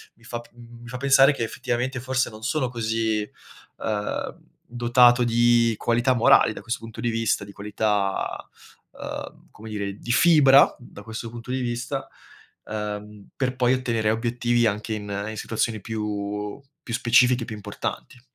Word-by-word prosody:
mi 115 - -26
fa 120 +1 -5
p 120 - -16
mi 120 0 -14
fa 125 +2 -6
pensare 135 +1 +6
che 130 - -3
effettivamente 125 +2 -2
forse 130 +1 0
non 110 0 -12
sono 130 +1 0
così, 110 -2 -1 0.6
ehm, 105 -2 -3 0.4
dotato 120 0 +5
di 120 -1 +3
qualità 120 +4 +2
morali 115 -1 +5
da - - -9
questo 120 +4 -3
punto 115 -1 -10
di 120 - 0
vista, 115 -2 0
di 100 - -11
qualità, 100 -1 -2 0.5
ehm, - - -7
come 110 +1 -11
dire, 100 -2 -3
di 120 - -4
fibra 140 -1 +6
da 120 - -13
questo 115 +1 -6
punto 120 +1 -8
di 130 - -1
vista, 120 +3 -3 0.6
ehm, 105 -1 -6
per 130 -1 -1
poi 125 0 +3
ottenere 115 -4 0
obiettivi 120 +1 +1
anche 110 +1 -1
in 100 -1 -4
in 110 - -7
situazioni 110 -1 -2
più 105 0 -4 0.2
più 115 - -6
specifiche 120 0 +4
e - - -6
più 110 - -6
importanti. 105 +3 -6
115 Hz, 160 wpm, -24 LUFS, 110-125 Hz, 0.6 s, pensare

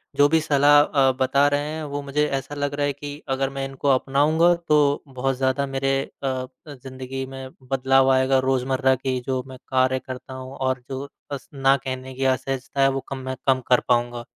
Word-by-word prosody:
जो 145 - +5
भी 160 +1 +4
सलाह 145 -1 +5
अ, 135 -2 +3
बता 140 +2 +3
रहे 145 0 +1
हैं 160 0 -5
वो 145 -1 -4
मुझे 140 +1 0
ऐसा 135 +1 -4
लग 145 0 -2
रहा 145 0 0
है 145 - 0
कि, 145 +1 -8
अगर 135 0 0
मैं 135 0 -4
इनको 135 +1 -5
अपनाऊँगा, 145 +6 +3
तो 150 -4 +2
बहुत 135 0 -2
ज़्यादा 130 +1 +1
मेरे 135 0 -1 0.3
अ - - 0
अ, 130 -1 -2 0.3
ज़िंदगी 130 0 -7
में 130 0 -8 0.2
बदलाव 135 0 +3
आएगा 130 0 +3
रोज़मर्रा 130 0 +2
की 130 0 -2
जो 130 -1 -1
मैं 130 -1 -10
कार्य 130 0 +2
करता 130 0 -9
हूँ 130 +1 -8
और 130 -1 -1
जो 135 +1 -5 0.2
अस 140 -4 -6
ना 135 0 +3
कहने 130 0 -6
की 135 +1 -2
असहजता 135 +1 -1
है 135 - +5
वो 135 - -2
कम 135 - -4
मैं 130 - -2
कम 130 -1 +3
कर 125 - +6
पाऊँगा। 120 -1 +1
135 Hz, 205 wpm, -23 LUFS, 130-140 Hz, 0.3 s, कर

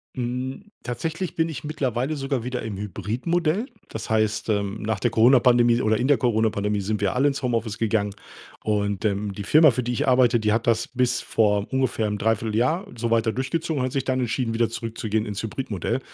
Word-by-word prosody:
Hm, 130 - -4
tatsächlich 160 +8 -4
bin 165 0 +1
ich 155 - -6
mittlerweile 135 -1 -1
sogar 135 -2 -2
wieder 125 0 -3
im 110 -3 -5
Hybridmodell. 145 - -1 0.2
Das 110 0 -6
heißt, 110 -1 +1
ähm, 100 -1 -1
nach 110 -2 -2
der 120 - +1
Corona-Pandemie 120 0 +5
oder 110 -1 +2
in 125 - 0
der 145 -3 +4
Corona-Pandemie 110 -3 +1
sind 105 +1 -2
wir 100 +4 0
alle 135 +3 +3
ins 140 -1 -2
Homeoffice 115 -3 -1
gegangen. 105 -3 0 0.5
Und, 100 -1 -1
ähm, 100 -1 -1
die 100 - -6
Firma, 155 +7 +6
für 125 +1 -2
die 120 - -2
ich 125 - -1
arbeite, 125 -2 +4
die 105 -1 +1
hat 115 +1 -1
das 115 0 +2
bis 125 -1 0
vor 105 -2 +1
ungefähr 125 -5 0
'nem 105 - -2
Dreivierteljahr 115 - 0
so 115 0 -2
weiter 115 -1 +2
durchgezogen 160 +4 -2
und - - +1
hat - - -5
sich 135 0 -2
dann 130 -1 0
entschieden, 120 -1 -1
wieder 115 0 +1
zurückzugehen 110 -1 -3
ins 105 0 -5
Hybridmodell. 115 0 -3
115 Hz, 195 wpm, -24 LUFS, 110-130 Hz, 0.5 s, Firma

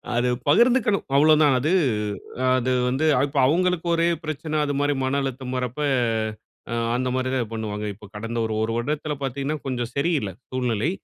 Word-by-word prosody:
அது 120 +1 +2 0.2
பகிர்ந்துக்கணும், 235 - +4
அவ்வளோதான். 150 0 +5
அது 150 +6 0 0.9
அது 130 0 0 0.2
வந்து 135 +5 0 0.2
இப்போ 140 0 -1
அவங்களுக்கு 180 +3 +1
ஒரே 165 0 +2 0.2
பிரச்சனை, 155 0 -4
அதுமாதிரி 145 0 0
மன 135 +2 +1
அழுத்தம் 130 -1 -4
வரப்போ 125 +4 -2 1.1
அந்த 130 +1 -1
மாரி 130 0 -1
தான் 120 -4 -1
பண்ணுவாங்க. 105 -1 -4
இப்ப 105 +2 -14
கடந்த 115 +3 -4
1 110 - -2
1 110 - -1
வருடத்தில 150 +5 -2
பாத்தீங்கன்னா 140 +3 -2
கொஞ்சம் 120 -3 -2
சரி 140 +5 +1
இல்ல, 105 - -4 0.2
சூழ்நிலை. 125 0 0
135 Hz, 150 wpm, -24 LUFS, 120-155 Hz, 1.1 s, அவ்வளோதான்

